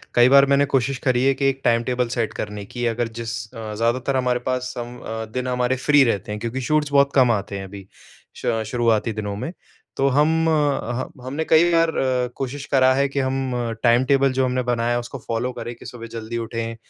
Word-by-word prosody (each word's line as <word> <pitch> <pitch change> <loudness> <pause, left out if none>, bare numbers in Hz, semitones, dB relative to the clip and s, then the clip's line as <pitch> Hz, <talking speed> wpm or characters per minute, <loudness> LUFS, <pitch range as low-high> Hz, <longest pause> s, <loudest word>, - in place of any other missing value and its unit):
कई 120 +1 +6
बार 140 0 +7
मैंने 140 +1 +3
कोशिश 135 -1 0
करी 125 -1 +2
है 135 - +4
कि 135 +1 -2
एक 135 0 -4
टाइम 115 0 +3
टेबल 125 0 -1
सेट 115 -3 -1
करने 105 -1 -5
की 120 +4 -4
अगर 115 +1 -1
जिस 115 -1 -4 0.2
अ, 110 -1 -6
ज़्यादातर 120 +4 0
हमारे 125 -1 +1
पास 130 0 -2
हम 120 0 -6
अ, 110 0 -5
दिन 125 0 -2
हमारे 125 0 0
फ्री 145 -1 +6
रहते 105 -4 -1
हैं 105 - -4
क्योंकि 120 +3 -3
शूट्स 150 +2 0
बहुत 140 0 +4
कम 125 -3 +5
आते 100 -2 -2
हैं 95 - -6
अभी 95 0 -11 0.6
श 115 -1 0
शुरुआती 115 -2 +1
दिनों 105 -1 -4
में। 125 +10 -4 0.5
तो 135 - +2
हम 150 +4 +3 0.2
ह 140 -5 0 0.2
हमने 140 +5 -3
कई 160 +1 +5
बार 165 -1 +3 0.4
कोशिश 135 +1 -5
करा 130 -1 +4
है 140 +1 +2
कि 140 - -2
हम 130 -1 -1 0.3
टाइम 120 +1 +4
टेबल 135 0 +3
जो 130 0 +1
हमने 125 0 0
बनाया 120 -1 0
है 120 - +1
उसको 120 +3 -7
फॉलो 115 +2 -1
करें 120 - -6
कि - - -15
सुबह 115 -2 -8
जल्दी 115 +1 -5
उठें 115 0 -4
125 Hz, 215 wpm, -22 LUFS, 115-135 Hz, 0.6 s, बार